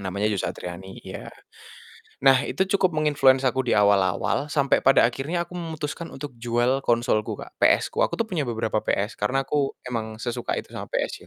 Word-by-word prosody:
Namanya 100 Hz, +3 st, -1 dB
Joe 100 Hz, -, -1 dB
Satriani, 90 Hz, +2 st, -8 dB
iya. -, -, -8 dB, 1.0 s
Nah, 135 Hz, 0 st, +5 dB
itu 190 Hz, -, +1 dB
cukup 180 Hz, -4 st, +1 dB
meng-influence 140 Hz, -3 st, +3 dB
aku 130 Hz, 0 st, +1 dB
di -, -, +3 dB
awal-awal, 100 Hz, +6 st, +2 dB
sampai 140 Hz, -2 st, +2 dB
pada 135 Hz, -, +5 dB
akhirnya 140 Hz, +9 st, 0 dB
aku 175 Hz, -, -15 dB
memutuskan 160 Hz, 0 st, -5 dB
untuk 140 Hz, +1 st, -7 dB
jual 120 Hz, +3 st, +1 dB
konsolku, 115 Hz, -2 st, +1 dB
Kak, -, -, -10 dB
PS-ku. -, -, +3 dB
Aku -, -, -4 dB
tuh 230 Hz, -, 0 dB
punya 155 Hz, -7 st, -2 dB
beberapa 110 Hz, -2 st, -1 dB
PS, 105 Hz, +2 st, -2 dB
karena 135 Hz, +6 st, 0 dB
aku 140 Hz, 0 st, -1 dB
emang 110 Hz, -3 st, -4 dB
sesuka 120 Hz, 0 st, -2 dB
itu -, -, -6 dB
sama -, -, -7 dB
PS -, -, -3 dB
130 Hz, 175 wpm, -24 LUFS, 110-145 Hz, 1.0 s, Nah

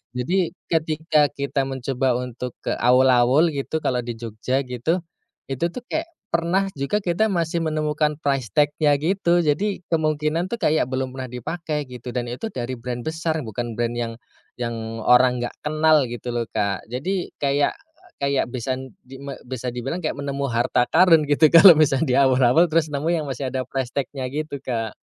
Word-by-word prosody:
Jadi 175 Hz, +8 st, 0 dB, 0.2 s
ketika 155 Hz, -2 st, +2 dB
kita 140 Hz, -1 st, -2 dB
mencoba 130 Hz, -1 st, -1 dB
untuk 125 Hz, 0 st, -5 dB
ke -, -, -1 dB
awul-awul 130 Hz, +5 st, +4 dB
gitu 150 Hz, +2 st, -3 dB
kalo 125 Hz, -1 st, +1 dB
di 120 Hz, -1 st, -5 dB
Jogja 115 Hz, +4 st, -2 dB
gitu, 130 Hz, +8 st, -2 dB, 0.5 s
itu 135 Hz, +6 st, -1 dB
tuh 240 Hz, +8 st, -8 dB
kayak 325 Hz, +1 st, -1 dB, 0.2 s
pernah 170 Hz, +4 st, +1 dB
juga 140 Hz, +8 st, -1 dB
kita 185 Hz, +5 st, +1 dB
masih 170 Hz, -2 st, 0 dB
menemukan 150 Hz, -1 st, 0 dB
price 135 Hz, -5 st, -1 dB
tag-nya 145 Hz, 0 st, +3 dB
gitu. 175 Hz, +2 st, +1 dB
Jadi 180 Hz, +5 st, 0 dB
kemungkinan 155 Hz, +1 st, 0 dB
tuh 235 Hz, -, -3 dB
kayak 155 Hz, -, +1 dB
belum 130 Hz, 0 st, -2 dB
pernah 130 Hz, -1 st, -5 dB
dipake 150 Hz, +5 st, -4 dB
gitu, 125 Hz, 0 st, -8 dB
dan 120 Hz, -, -1 dB
itu 125 Hz, -, -4 dB
dari 125 Hz, -, -4 dB
brand 120 Hz, 0 st, -5 dB
besar 160 Hz, -1 st, -2 dB
bukan 115 Hz, +1 st, -5 dB
brand 120 Hz, +1 st, -1 dB
yang 120 Hz, -1 st, -3 dB, 0.4 s
yang 115 Hz, -2 st, -5 dB
orang 125 Hz, +1 st, +4 dB
nggak 120 Hz, -, -4 dB
kenal 155 Hz, -2 st, +3 dB
gitu 120 Hz, +1 st, -5 dB
loh, 120 Hz, -1 st, -2 dB
Kak. 100 Hz, 0 st, -2 dB
Jadi 175 Hz, +10 st, -2 dB, 0.2 s
kayak 140 Hz, +1 st, +2 dB, 0.5 s
kayak 140 Hz, -1 st, +1 dB
bisan 130 Hz, 0 st, -4 dB
di 130 Hz, +1 st, -12 dB
me 140 Hz, -1 st, -7 dB
bisa 125 Hz, 0 st, -6 dB
dibilang 135 Hz, +8 st, -3 dB
kayak 155 Hz, -, -2 dB
nemu 140 Hz, -1 st, -3 dB
harta 120 Hz, 0 st, +1 dB
karun 165 Hz, -3 st, +5 dB
gitu 150 Hz, +1 st, +5 dB
kalo 170 Hz, +1 st, +10 dB
misalnya 150 Hz, -1 st, +3 dB
di 125 Hz, -, +2 dB
Awul-awul, 130 Hz, +3 st, +5 dB
terus 160 Hz, -1 st, +2 dB
nemu 145 Hz, +3 st, -2 dB
yang 160 Hz, -3 st, -1 dB
masih 130 Hz, 0 st, -3 dB
ada 130 Hz, -1 st, -1 dB
price 130 Hz, -2 st, -3 dB
tag-nya 135 Hz, -1 st, -3 dB
gitu, 150 Hz, 0 st, -4 dB
Kak. 115 Hz, -4 st, -3 dB
140 Hz, 170 wpm, -23 LUFS, 125-160 Hz, 0.5 s, kalo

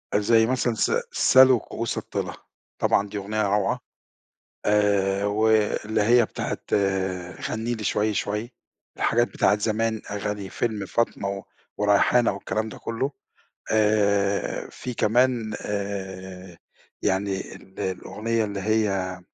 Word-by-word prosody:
زي 110 Hz, +2 st, +4 dB
مثلًا 125 Hz, -1 st, 0 dB
س 110 Hz, -, +1 dB, 0.2 s
"سلوا 130 Hz, -2 st, +6 dB
كؤوس 115 Hz, +2 st, -4 dB
الطلا" -, -, -3 dB, 0.5 s
طبعًا 100 Hz, -, +2 dB
دي 105 Hz, -, -5 dB
أغنية 105 Hz, +2 st, -2 dB
روعة. 100 Hz, 0 st, +1 dB, 0.9 s
آآ 100 Hz, -1 st, +2 dB
واللي 110 Hz, 0 st, +2 dB
هي 120 Hz, +2 st, +5 dB
بتاعة -, -, -4 dB, 0.9 s
"غنِّي 115 Hz, +2 st, -2 dB
لي 110 Hz, -, -7 dB
شوي 105 Hz, +1 st, +1 dB
شوي،" 105 Hz, +5 st, -2 dB, 0.4 s
الحاجات 120 Hz, +1 st, +2 dB
بتاعة 105 Hz, -, +2 dB
زمان 110 Hz, +1 st, 0 dB
أغاني 105 Hz, -1 st, -3 dB
فيلم 110 Hz, -4 st, -2 dB
فاطمة 100 Hz, 0 st, -1 dB
و 100 Hz, 0 st, -5 dB, 0.3 s
وريحانة 105 Hz, +3 st, +4 dB
والكلام 110 Hz, +3 st, -3 dB
ده -, -, -9 dB
كله. 125 Hz, +5 st, -3 dB, 0.6 s
آآ 100 Hz, -2 st, +2 dB
في 125 Hz, -, -6 dB
كمان 115 Hz, 0 st, +2 dB
آآ 95 Hz, -3 st, -5 dB, 0.4 s
يعني 95 Hz, 0 st, -1 dB
ال 95 Hz, -, -15 dB
الأغنية 110 Hz, +4 st, -2 dB
اللي 100 Hz, -1 st, -4 dB
هي 95 Hz, -3 st, 0 dB
105 Hz, 120 wpm, -25 LUFS, 100-110 Hz, 0.9 s, سلوا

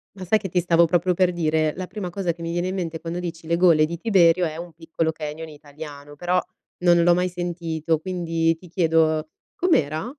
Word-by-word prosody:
Ma 190 Hz, -, -8 dB
sai 215 Hz, +4 st, +3 dB
che 190 Hz, -, -6 dB
ti 180 Hz, -, +1 dB
stavo 170 Hz, -1 st, +4 dB
proprio 180 Hz, +1 st, +2 dB
per 180 Hz, 0 st, +2 dB
dire, 155 Hz, -2 st, 0 dB
la 185 Hz, -1 st, -4 dB
prima 190 Hz, -2 st, -5 dB
cosa 175 Hz, -2 st, -2 dB
che 170 Hz, -, -14 dB
mi 165 Hz, 0 st, -3 dB
viene 175 Hz, +1 st, -1 dB
in 185 Hz, -, -3 dB
mente 165 Hz, -3 st, -3 dB
quando 170 Hz, +1 st, -5 dB
dici 170 Hz, -2 st, -6 dB
le 170 Hz, -, +2 dB
gole 170 Hz, -3 st, +5 dB
di 170 Hz, +2 st, -5 dB
Tiberio 180 Hz, -3 st, +4 dB
è 155 Hz, 0 st, -4 dB
un 170 Hz, -1 st, -8 dB
piccolo 160 Hz, 0 st, -2 dB
canyon 155 Hz, +1 st, -6 dB
italiano, 145 Hz, -1 st, -11 dB
però 180 Hz, +2 st, 0 dB, 0.4 s
non 175 Hz, -1 st, +4 dB
l'ho 175 Hz, 0 st, +5 dB
mai 180 Hz, +1 st, +1 dB
sentito, 165 Hz, -2 st, -2 dB
quindi 165 Hz, -2 st, 0 dB
ti 180 Hz, -, -15 dB
chiedo: 160 Hz, -2 st, +1 dB, 0.3 s
com'era? 165 Hz, -, +1 dB
170 Hz, 210 wpm, -23 LUFS, 160-180 Hz, 0.4 s, gole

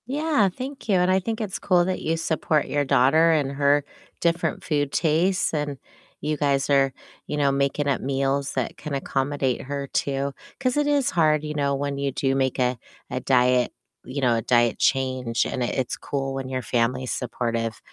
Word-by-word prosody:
Yeah, 290 Hz, -6 st, +2 dB
thank 260 Hz, +5 st, -8 dB
you, 200 Hz, -, +4 dB
and 180 Hz, 0 st, +3 dB
I 190 Hz, -, +4 dB
think 220 Hz, +4 st, -3 dB
it's 210 Hz, -4 st, -4 dB
cool 180 Hz, -2 st, +3 dB
that 185 Hz, 0 st, -2 dB
you 165 Hz, +1 st, 0 dB
support 160 Hz, -2 st, 0 dB
your 145 Hz, 0 st, 0 dB
daughter 145 Hz, +5 st, +4 dB
and 145 Hz, -4 st, +1 dB
her 140 Hz, +1 st, +2 dB, 0.4 s
different 170 Hz, 0 st, 0 dB
food 145 Hz, -4 st, 0 dB
tastes, 170 Hz, +4 st, +1 dB
and 145 Hz, -2 st, -2 dB, 0.4 s
you 150 Hz, 0 st, -1 dB
guys 140 Hz, -2 st, +1 dB
are, 135 Hz, -1 st, +4 dB, 0.4 s
you 150 Hz, -, -3 dB
know, 140 Hz, -1 st, +3 dB
making 140 Hz, +1 st, 0 dB
up 140 Hz, -, +1 dB
meals 135 Hz, +1 st, -1 dB
that 130 Hz, -3 st, -2 dB
can 150 Hz, -, -6 dB
accommodate 135 Hz, -1 st, -1 dB
her 140 Hz, +1 st, -4 dB
too. 140 Hz, 0 st, -1 dB, 0.3 s
'Cause 255 Hz, 0 st, 0 dB
it 295 Hz, -, +2 dB
is 285 Hz, -3 st, +2 dB
hard, 155 Hz, -3 st, +3 dB
you 150 Hz, 0 st, -4 dB
know, 140 Hz, -1 st, +1 dB
when 140 Hz, 0 st, -2 dB
you 140 Hz, 0 st, -1 dB
do 135 Hz, +1 st, 0 dB
make 130 Hz, -1 st, 0 dB
a 125 Hz, 0 st, +1 dB, 0.3 s
a 125 Hz, -, -2 dB
diet 125 Hz, -1 st, +3 dB, 0.3 s
you 130 Hz, +3 st, -5 dB
know, 125 Hz, -3 st, +3 dB
a 115 Hz, -, 0 dB
diet 120 Hz, +1 st, +2 dB
change, 130 Hz, -3 st, +1 dB
and 125 Hz, -, -3 dB
it 120 Hz, -, -1 dB
it's 130 Hz, -2 st, -1 dB
cool 135 Hz, -1 st, -3 dB
when 135 Hz, -1 st, -4 dB
your 130 Hz, -1 st, -3 dB
family's 125 Hz, +2 st, 0 dB
supportive 115 Hz, -2 st, -2 dB
140 Hz, 195 wpm, -24 LUFS, 130-160 Hz, 0.4 s, you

